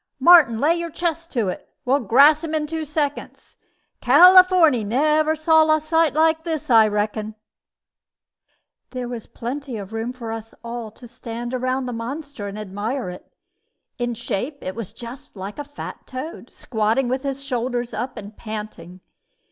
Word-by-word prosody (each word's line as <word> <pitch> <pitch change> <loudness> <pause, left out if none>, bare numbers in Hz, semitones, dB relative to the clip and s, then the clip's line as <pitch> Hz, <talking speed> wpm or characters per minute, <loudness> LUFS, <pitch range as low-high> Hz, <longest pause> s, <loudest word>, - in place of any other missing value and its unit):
"Martin, 320 -10 +6
lay 300 +6 +3
your 340 0 -4
chest 335 0 -3
to 230 -6 0
it. 180 - -5 0.2
We'll 265 +3 +3
grass 280 - +5
him 320 -1 -3
in 305 -1 0
two 320 +1 -4
seconds. 295 -1 -4 0.4
Californy 365 - +7
never 305 +8 +2
saw 315 0 +4
a - - 0
sight 315 -1 +1
like 320 0 +3
this, 315 -4 -3
I 225 -2 +7
reckon." 210 +1 -2 1.5
There 250 -1 -5
was 240 -2 -7
plenty 255 +1 -6
of 200 +1 -8
room 225 +2 -3
for 240 -3 -7
us 225 0 -7
all 235 -1 -6
to 240 +3 -14
stand 235 +1 -7
round 255 +1 -1
the 245 - -4
monster 265 0 -6
and 200 +1 -7
admire 210 +2 -4
it. 180 - -13 0.7
In 240 -1 -2
shape 240 +5 -4
it 185 - -4
was 225 -3 -7
just 255 +4 -11
like 200 +6 -7
a - - -3
fat 290 +1 -9
toad, 260 -1 -7
squatting 225 +3 -1
with 260 +2 -1
his 275 0 -4
shoulders 245 -2 -2
up 245 +3 -4
and 210 0 -9
panting. 210 -5 -8
255 Hz, 165 wpm, -22 LUFS, 225-305 Hz, 1.5 s, Californy